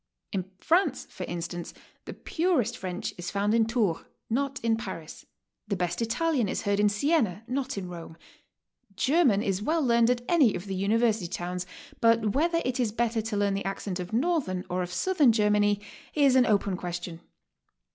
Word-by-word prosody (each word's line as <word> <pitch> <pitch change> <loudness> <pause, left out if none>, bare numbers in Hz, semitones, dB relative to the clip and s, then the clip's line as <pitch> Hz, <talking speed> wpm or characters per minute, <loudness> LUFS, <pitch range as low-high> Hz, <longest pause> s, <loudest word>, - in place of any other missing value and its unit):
In 190 -1 -3
France, 340 - +1
for - - -6
instance, 175 0 -5 0.3
the - - -6
purest 330 - 0
French 185 -1 -4
is 175 0 -4
found 205 +1 0
in 225 -1 +3
Tours, 220 -8 0 0.3
not 275 +2 -1
in 230 -1 +3
Paris; 190 -7 -8 0.4
the 205 - -1
best 175 +2 -2
Italian 245 - +1
is - - -2
heard 200 0 +1
in 210 0 +4
Siena, 220 - +1
not 255 -2 -2
in 190 -2 -4
Rome. 170 -2 -9 0.8
German 260 - +3
is 195 0 -1
well 315 +7 +1
learned 235 -2 +4
at 245 -1 +1
any 295 -11 +4
of 175 - -5
the 195 - -4
university 215 0 +1
towns, 180 +1 -4 0.3
but 230 -3 +3
whether 335 +4 +1
it 255 +1 -1
is 235 -4 +1
better 230 0 0
to 215 -1 -3
learn 200 -1 +1
the 195 - -2
accent 195 -1 -3
of 180 0 -5
northern 245 - 0
or 180 +1 0
of 180 0 -4
southern 295 - +3
Germany 210 -2 +2 0.4
is 280 -3 +4
an 255 -1 +5
open 200 -2 +2
question. 175 -1 -5
210 Hz, 175 wpm, -27 LUFS, 185-250 Hz, 0.8 s, an